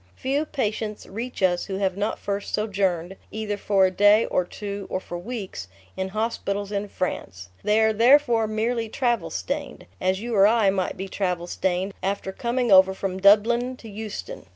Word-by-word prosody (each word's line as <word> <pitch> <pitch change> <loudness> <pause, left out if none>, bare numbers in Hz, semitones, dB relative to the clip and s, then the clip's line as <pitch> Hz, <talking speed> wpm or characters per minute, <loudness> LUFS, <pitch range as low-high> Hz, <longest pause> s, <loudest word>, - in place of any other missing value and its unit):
Few 280 +4 -1
patients 215 -6 -3
reach 230 +1 -6
us 175 -1 +2
who 195 - -4
have 190 -1 0
not 205 +2 -1
first 200 0 -3
sojourned, 195 -4 -1
either 215 -1 -3
for 200 -1 +3
a 185 - +1
day 205 +4 +5
or 180 - +1
two 200 +1 -6
or 185 - -1
for 175 -2 -7
weeks, 190 - -6 0.3
in 190 0 -3
hospitals 205 -1 -2
in 205 0 -2
France. 95 - -4
They 210 +1 +3
are 220 0 +3
therefore 235 0 +4
merely 225 +1 -1
travel 235 -8 0
stained, 90 -1 -4 0.2
as 185 +1 +1
you 235 +2 -4
or 200 -1 +6
I 220 -3 +4
might 190 -2 -2
be 190 +1 -4
travel 180 -3 -2
stained 185 +2 -1
after 195 0 -2
coming 240 +3 -1
over 190 0 +7
from 190 -1 -3
Dublin 235 +6 +4
to 230 - -12
Euston. 220 - -7
205 Hz, 175 wpm, -24 LUFS, 190-225 Hz, 0.3 s, over